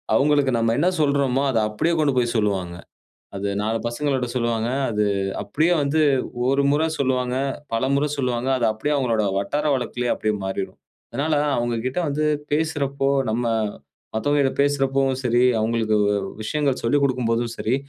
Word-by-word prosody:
அவங்களுக்கு 145 Hz, -1 st, +3 dB
நம்ம 115 Hz, 0 st, +1 dB
என்ன 170 Hz, +6 st, +3 dB
சொல்றோமோ 140 Hz, -2 st, +2 dB
அத 115 Hz, -, +2 dB
அப்படியே 160 Hz, +11 st, 0 dB
கொண்டுபோய் 130 Hz, -6 st, +1 dB
சொல்லுவாங்க. 95 Hz, -5 st, -1 dB, 0.6 s
அது 100 Hz, +1 st, -2 dB
நாலு 110 Hz, +2 st, 0 dB
பசங்கள்கிட்ட 130 Hz, +1 st, -1 dB
சொல்லுவாங்க. 115 Hz, -2 st, 0 dB, 0.2 s
அது 105 Hz, -2 st, 0 dB, 0.4 s
அப்படியே 155 Hz, -, +1 dB
வந்து 145 Hz, +2 st, +1 dB, 0.5 s
ஒரு 135 Hz, +1 st, +2 dB
முறை 155 Hz, +3 st, +2 dB
சொல்லுவாங்க. 130 Hz, -2 st, 0 dB, 0.4 s
பலமுறை 140 Hz, +5 st, +1 dB
சொல்லுவாங்க. 125 Hz, -1 st, -1 dB
அது 120 Hz, -, +1 dB
அப்படியே 125 Hz, +8 st, -2 dB
அவங்களுடைய 115 Hz, -6 st, +1 dB
வட்டார 145 Hz, +10 st, -2 dB
வழக்கிலயே 125 Hz, -1 st, -2 dB
அப்படியே 110 Hz, 0 st, -1 dB
மாறிடும். 95 Hz, 0 st, -4 dB, 0.3 s
அதனால 145 Hz, +6 st, 0 dB, 0.2 s
அவங்ககிட்ட 120 Hz, +4 st, -1 dB
வந்து 150 Hz, +2 st, 0 dB, 0.3 s
பேசுறப்போ, 140 Hz, -3 st, 0 dB, 0.2 s
நம்ம 120 Hz, +2 st, -1 dB, 0.7 s
மத்தவங்ககிட்ட 140 Hz, +3 st, +1 dB
பேசுறப்பவும் 135 Hz, -2 st, +1 dB
சரி, 120 Hz, +1 st, +3 dB, 0.2 s
அவங்களுக்கு 110 Hz, -1 st, +1 dB
வு 105 Hz, -, +2 dB, 0.3 s
விஷயங்கள் 140 Hz, +2 st, -1 dB
சொல்லிக் 140 Hz, +5 st, +2 dB
கொடுக்கும் 125 Hz, -3 st, -1 dB
போதும் 115 Hz, 0 st, -1 dB
சரி, 115 Hz, +4 st, 0 dB
130 Hz, 140 wpm, -22 LUFS, 115-140 Hz, 0.7 s, அவங்களுக்கு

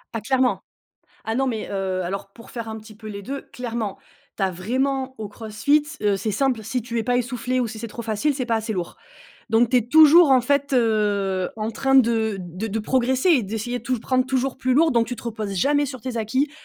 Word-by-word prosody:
Ah 225 Hz, -, -2 dB
clairement. 260 Hz, +2 st, +1 dB, 0.6 s
Ah 225 Hz, -, -2 dB
non 270 Hz, +3 st, +1 dB
mais 225 Hz, -4 st, -2 dB
heu, 190 Hz, -2 st, -2 dB
alors 195 Hz, +2 st, -5 dB
pour 230 Hz, -, -14 dB
faire 230 Hz, -2 st, -6 dB
un 220 Hz, -, -5 dB
petit 215 Hz, 0 st, -13 dB
peu 215 Hz, +1 st, -13 dB
les 200 Hz, -1 st, -7 dB
2, 275 Hz, +6 st, -5 dB
clairement. 230 Hz, -5 st, -4 dB, 0.4 s
Tu -, -, -4 dB
as 190 Hz, -, +2 dB
vraiment 260 Hz, +8 st, -1 dB
au 215 Hz, -2 st, -5 dB
CrossFit, 225 Hz, +8 st, +1 dB, 0.2 s
heu, 205 Hz, -1 st, +2 dB
c'est 215 Hz, -, -2 dB
simple, 245 Hz, +1 st, 0 dB
si 230 Hz, +3 st, -2 dB
tu 235 Hz, +1 st, -3 dB
es -, -, 0 dB
pas 245 Hz, +2 st, +1 dB
essoufflée 245 Hz, +1 st, -1 dB
ou 250 Hz, -, +1 dB
si 220 Hz, 0 st, -7 dB
c'est 230 Hz, -, -5 dB
trop 235 Hz, -, -7 dB
facile, 225 Hz, +6 st, 0 dB
c'est 260 Hz, -1 st, -2 dB
pas 230 Hz, -2 st, +1 dB
assez 220 Hz, 0 st, -3 dB
lourd, 175 Hz, -2 st, -4 dB, 0.5 s
donc 225 Hz, +1 st, +3 dB
tu 255 Hz, -, +4 dB
es -, -, +2 dB
toujours, 315 Hz, +2 st, +8 dB
en 260 Hz, -2 st, +5 dB
fait, 280 Hz, +2 st, +1 dB
heu, 205 Hz, -5 st, +1 dB
en 215 Hz, 0 st, -2 dB
train 270 Hz, +4 st, 0 dB
de 225 Hz, -4 st, +3 dB
de 180 Hz, +4 st, -5 dB
de 220 Hz, +1 st, -2 dB
progresser 260 Hz, -, +1 dB
et 285 Hz, -8 st, +4 dB
d'essayer 225 Hz, +4 st, -3 dB
tout, 255 Hz, 0 st, -1 dB
prendre 255 Hz, +3 st, 0 dB
toujours 265 Hz, 0 st, -1 dB
plus 255 Hz, -1 st, +1 dB
lourd 320 Hz, +4 st, +4 dB
donc 235 Hz, -1 st, +2 dB
tu 245 Hz, -, -5 dB
te -, -, -11 dB
reposes 215 Hz, -4 st, -4 dB
jamais 285 Hz, +8 st, +2 dB
sur 260 Hz, -4 st, -8 dB
tes 255 Hz, -3 st, -4 dB
acquis. 260 Hz, +7 st, 0 dB
235 Hz, 235 wpm, -23 LUFS, 215-260 Hz, 0.6 s, toujours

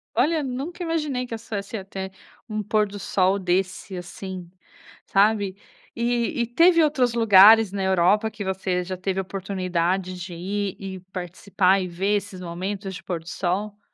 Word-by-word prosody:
Olha, 320 Hz, 0 st, +2 dB
nunca 280 Hz, +8 st, -4 dB
imaginei 300 Hz, -6 st, -1 dB
que 235 Hz, -, -8 dB
a -, -, -1 dB
essa 225 Hz, -1 st, -7 dB
essa 200 Hz, +2 st, -5 dB
até 190 Hz, 0 st, -6 dB, 0.4 s
um 215 Hz, 0 st, -2 dB
pôr 210 Hz, -1 st, +2 dB
do 205 Hz, 0 st, -8 dB
sol 190 Hz, +1 st, +2 dB
desse 185 Hz, +1 st, -1 dB
assim, 180 Hz, 0 st, -7 dB, 0.6 s
sabe. 200 Hz, -1 st, +2 dB, 0.4 s
E 240 Hz, +2 st, 0 dB
e 235 Hz, -, 0 dB
teve 335 Hz, +6 st, +5 dB
outros 260 Hz, -6 st, +2 dB
lugares 220 Hz, -1 st, +7 dB
na 195 Hz, -1 st, -2 dB
Europa 190 Hz, +4 st, +3 dB
que 205 Hz, -, -6 dB
você 185 Hz, -1 st, -1 dB
já 185 Hz, +1 st, -5 dB
teve 190 Hz, 0 st, -2 dB
a -, -, -1 dB
oportunidade 185 Hz, -1 st, -2 dB
de 175 Hz, 0 st, -7 dB
ir 195 Hz, +3 st, -3 dB
e 190 Hz, -1 st, -6 dB
participar 185 Hz, +1 st, +1 dB
e 185 Hz, -, -3 dB
ver 195 Hz, +4 st, 0 dB
esses 195 Hz, -2 st, -7 dB
momentos 190 Hz, +3 st, -4 dB
de -, -, -9 dB
pôr 175 Hz, -3 st, -3 dB
do 165 Hz, -, -19 dB
sol? 205 Hz, +3 st, -2 dB
195 Hz, 170 wpm, -24 LUFS, 185-220 Hz, 0.6 s, lugares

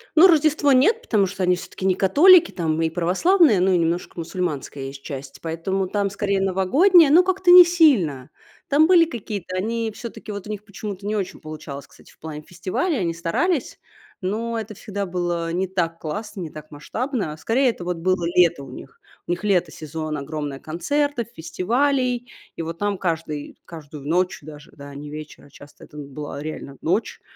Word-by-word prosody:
Ну, 335 Hz, +4 st, +9 dB
Рождество 305 Hz, -3 st, +3 dB
нет, 290 Hz, -, +4 dB
потому 210 Hz, -, +2 dB
что 190 Hz, 0 st, -4 dB
они 180 Hz, 0 st, +3 dB
всё-таки 180 Hz, +1 st, -8 dB
не 190 Hz, -1 st, +3 dB
католики, 335 Hz, -, +6 dB
там 160 Hz, -3 st, -1 dB
и 165 Hz, -, +1 dB
православные, 200 Hz, -, +3 dB
но 190 Hz, +1 st, +3 dB
и 180 Hz, -, +4 dB
немножко 170 Hz, +1 st, -1 dB
мусульманская 160 Hz, -5 st, -4 dB
есть 135 Hz, 0 st, -9 dB
часть. 135 Hz, -1 st, -8 dB
Поэтому 175 Hz, +4 st, -2 dB
там, 200 Hz, +1 st, -1 dB
скорее 200 Hz, 0 st, -1 dB
новогодняя, 275 Hz, -, +4 dB
но 345 Hz, +4 st, +7 dB
как-то 375 Hz, -1 st, +2 dB
не 360 Hz, 0 st, +12 dB
сильно. 220 Hz, -, +3 dB, 0.4 s
Там 300 Hz, +3 st, +4 dB
были 345 Hz, -2 st, +6 dB
какие-то 205 Hz, -, -6 dB
они 225 Hz, +3 st, -2 dB
всё-таки 230 Hz, -2 st, -8 dB
вот 200 Hz, -2 st, -6 dB
у -, -, -10 dB
них 210 Hz, -1 st, -5 dB
почему-то 200 Hz, -1 st, -7 dB
не 215 Hz, -, -1 dB
очень 195 Hz, -3 st, -4 dB
получалось, 150 Hz, -3 st, -8 dB
кстати, -, -, -19 dB
в -, -, -25 dB
плане 155 Hz, -1 st, -7 dB
фестивалей, 185 Hz, -, -2 dB
они 170 Hz, -3 st, -1 dB
старались, 245 Hz, -, -1 dB, 0.4 s
но 225 Hz, +4 st, -2 dB
это 220 Hz, 0 st, -7 dB
всегда 200 Hz, +1 st, -5 dB
было 175 Hz, -2 st, -2 dB
не 185 Hz, +2 st, 0 dB
так 170 Hz, -3 st, -2 dB
классно, 210 Hz, +5 st, -6 dB
не 165 Hz, -, -5 dB
так 155 Hz, 0 st, -11 dB
масштабно. 210 Hz, -, -4 dB
Скорее 250 Hz, -, +2 dB
это 225 Hz, -, -5 dB
вот 180 Hz, -1 st, -2 dB
было 185 Hz, +1 st, 0 dB
лето 170 Hz, -5 st, +4 dB
у 135 Hz, -, -11 dB
них. 135 Hz, +1 st, -12 dB, 0.3 s
У -, -, -2 dB
них 175 Hz, +3 st, -3 dB
лето, 180 Hz, -5 st, +2 dB
сезон, 155 Hz, 0 st, -5 dB
огромное 145 Hz, -1 st, -5 dB
концертов, 240 Hz, -, -1 dB
фестивалей. 245 Hz, -, 0 dB, 0.3 s
И -, -, -3 dB
вот 165 Hz, +1 st, -5 dB
там 205 Hz, -1 st, -1 dB
каждый 160 Hz, -4 st, -3 dB
каждую 150 Hz, -3 st, -10 dB
ночь 180 Hz, +3 st, 0 dB
даже, 150 Hz, 0 st, -12 dB
да, 140 Hz, 0 st, -11 dB
не 145 Hz, +1 st, -8 dB
вечер, 155 Hz, 0 st, -9 dB
а -, -, -18 dB
часто 145 Hz, +1 st, -15 dB
это 150 Hz, -, -15 dB
была 145 Hz, 0 st, -7 dB
реально 145 Hz, -3 st, -7 dB
ночь, 190 Hz, +8 st, -1 dB
185 Hz, 185 wpm, -22 LUFS, 160-230 Hz, 0.4 s, не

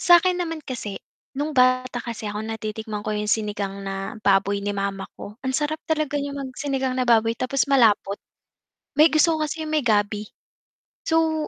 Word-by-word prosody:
Sa'kin 355 Hz, +1 st, +5 dB
naman 330 Hz, -3 st, -3 dB
kasi, 220 Hz, -6 st, -5 dB, 0.4 s
no'ng 290 Hz, +3 st, -2 dB
bata 255 Hz, 0 st, +3 dB
kasi 225 Hz, -3 st, -5 dB
ako, 210 Hz, -, -4 dB
natitikman 215 Hz, -1 st, -4 dB
ko 215 Hz, -, -3 dB
'yung 210 Hz, 0 st, -1 dB
sinigang 205 Hz, -2 st, -1 dB
na 195 Hz, 0 st, -4 dB
baboy 200 Hz, 0 st, +3 dB
ni 205 Hz, -, -1 dB
mama 195 Hz, -1 st, -2 dB
ko. 205 Hz, -, -8 dB
Ang 260 Hz, -, 0 dB
sarap 310 Hz, +1 st, -1 dB
talaga 310 Hz, -2 st, 0 dB
niya 285 Hz, 0 st, -3 dB
mag 275 Hz, -2 st, -5 dB
sinigang 270 Hz, -2 st, -1 dB
na 255 Hz, -, +3 dB
baboy 225 Hz, -1 st, +4 dB
tapos 270 Hz, +2 st, +1 dB
malapot. 210 Hz, -6 st, +4 dB, 0.8 s
May 310 Hz, -, +8 dB
gusto 320 Hz, +1 st, +4 dB
ko 310 Hz, -, 0 dB
kasi 315 Hz, +2 st, -4 dB
'yung 310 Hz, -, -4 dB
may 305 Hz, -, +2 dB
gabi. 205 Hz, -1 st, +2 dB, 0.9 s
So, 320 Hz, -1 st, +2 dB
245 Hz, 180 wpm, -24 LUFS, 205-300 Hz, 0.9 s, May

